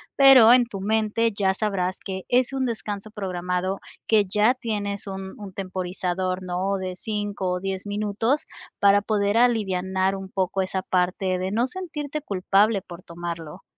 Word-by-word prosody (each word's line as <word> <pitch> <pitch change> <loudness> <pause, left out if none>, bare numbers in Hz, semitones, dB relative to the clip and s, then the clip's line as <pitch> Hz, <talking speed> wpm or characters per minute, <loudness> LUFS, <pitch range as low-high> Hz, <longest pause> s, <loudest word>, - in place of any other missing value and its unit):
Pero 270 -5 +8
en 250 -1 +5
tu 210 -4 -7
mente, 220 +2 +1
ya 195 -2 +2
sabrás 190 -3 -1
que 190 -1 -6
es 250 +1 +2
un 265 -1 0
descanso 215 -3 -4
programado, 185 -1 -2 0.3
que 215 -2 +4
ya 210 +5 +3
tienes 210 -5 -4
un 190 0 -6
un 200 -2 -8
temporizador, 185 -1 -3
¿no?, 185 +2 -1
de 185 -1 -4
5 205 -2 -3
o 180 - -2
10 195 +1 -4
minutos, 210 +7 0 0.3
para 200 0 +5
poder 205 0 +1
alivianar 190 -5 +1
un 195 -1 -7
poco 190 0 -1
esa 190 0 -2
parte 185 0 0
de 185 +1 -2
no 230 +4 +2
sentirte 300 -2 -5
culpable 200 -2 +2
por 175 0 -11
tomarlo, 170 -3 -7
195 Hz, 155 wpm, -24 LUFS, 185-220 Hz, 0.3 s, Pero